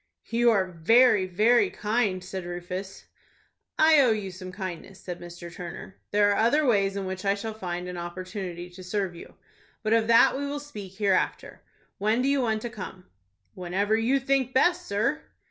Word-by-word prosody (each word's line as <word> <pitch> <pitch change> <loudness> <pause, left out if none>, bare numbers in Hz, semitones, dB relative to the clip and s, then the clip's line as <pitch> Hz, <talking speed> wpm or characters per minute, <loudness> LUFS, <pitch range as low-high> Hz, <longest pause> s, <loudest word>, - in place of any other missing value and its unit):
"You 235 +1 +4
are 200 -4 +3
very, 190 +4 +4
very 225 - +3
kind," 210 - -1
said 190 0 -6
Rufus. 180 +2 -6 0.7
"I 315 -1 +6
owe 255 - +4
you 210 -4 -1
some 185 0 -9
kindness," 190 0 -7
said 180 -1 -7
Mr. 175 0 -9
Turner. 180 +2 -8
"There 205 0 +3
are 200 - +1
other 285 +7 +3
ways 200 -5 +2
in 200 -1 -3
which 185 0 -5
I 200 0 +2
shall 220 +2 -5
find 180 -4 -5
an 180 0 -6
opportunity 180 0 -6
to 185 +1 -11
serve 190 0 -2
you. 170 - -12 0.5
But 215 0 +1
of 225 -1 +3
that 230 +2 +6
we 280 +1 -3
will 290 +1 -3
speak 210 -10 -9
here 200 -1 +1
after. - - -2 0.4
When 215 +5 +1
do - - +1
you 280 -1 +2
want 220 -3 -1
to 240 - -3
come?" 185 -3 -8 0.5
"Whenever 190 +4 0
you 235 +5 +2
think 265 -1 0
best, 355 +6 +3
sir." 230 +10 0
200 Hz, 185 wpm, -26 LUFS, 185-235 Hz, 0.7 s, I